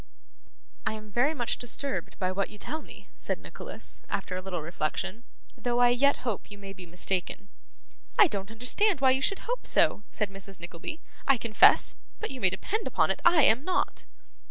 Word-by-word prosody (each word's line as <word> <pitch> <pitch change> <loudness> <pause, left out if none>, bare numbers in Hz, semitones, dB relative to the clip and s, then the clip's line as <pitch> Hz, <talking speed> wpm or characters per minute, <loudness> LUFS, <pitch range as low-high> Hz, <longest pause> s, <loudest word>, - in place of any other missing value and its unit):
'I - - +1
am 215 -1 -9
very 270 +8 +2
much 240 -4 0
disturbed 265 +3 -3
by 185 -2 0
what 195 +1 -1
you 210 - -10
tell 315 +9 -4
me,' - - -14
said - - -2
Nicholas, - - -9
after 185 - -2
a 185 - -3
little 180 -4 -4
reflection, 170 +7 -3 0.3
'though 240 -1 -1
I 245 0 +6
yet 265 +3 +3
hope 225 -6 -2
you 205 - -10
may 195 -1 -8
be 185 -2 -11
mistaken.' 180 +3 -2 0.7
'I 415 - +8
don't 195 -3 -3
understand 255 - +2
why 265 -1 +5
you 265 +1 +1
should 395 +7 0
hope - - -3
so,' - - +3
said 210 -2 -2
Mrs. 195 -1 -6
Nickleby, 170 - -6 0.3
'I 275 -2 +5
confess; 225 -1 +5 0.2
but 435 - -4
you 260 -2 -7
may 190 - +5
depend 405 - -2
upon - - +2
it - - -2
I 340 -3 +6
am 255 0 +5
not. 365 +2 0
225 Hz, 190 wpm, -28 LUFS, 195-275 Hz, 0.7 s, I